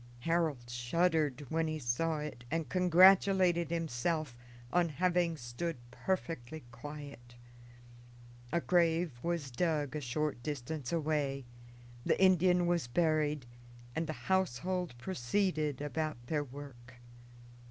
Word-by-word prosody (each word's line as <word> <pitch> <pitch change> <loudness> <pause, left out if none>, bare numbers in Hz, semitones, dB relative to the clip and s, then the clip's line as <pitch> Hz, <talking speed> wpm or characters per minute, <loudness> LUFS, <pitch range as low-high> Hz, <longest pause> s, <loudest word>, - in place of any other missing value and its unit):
Harold 160 -5 0
shuddered 145 +3 0
when 165 0 +1
he 155 0 -2
saw 155 +5 0
it 150 -5 -6
and 165 +1 -2
congratulated 185 -1 +5
himself 160 -3 -1 0.4
on 175 -1 +3
having 175 +1 +1
stood 135 +6 -4
perfectly 160 -3 -3
quiet. 140 -1 -9 1.2
A 170 - +1
grave 165 -6 +2
was 170 -5 -2
dug 150 0 0
a 150 - -2
short 145 +1 -2
distance 145 0 -4
away, 145 -5 0 0.6
the - - +1
Indian 180 -1 +5
was 170 -6 +1
buried, 150 0 +1 0.5
and 165 0 -1
the 155 - -2
household 180 -4 0
proceeded 155 0 -1
about 155 0 -2
their 150 +3 0
work. 130 -3 -11
155 Hz, 110 wpm, -33 LUFS, 135-170 Hz, 1.2 s, congratulated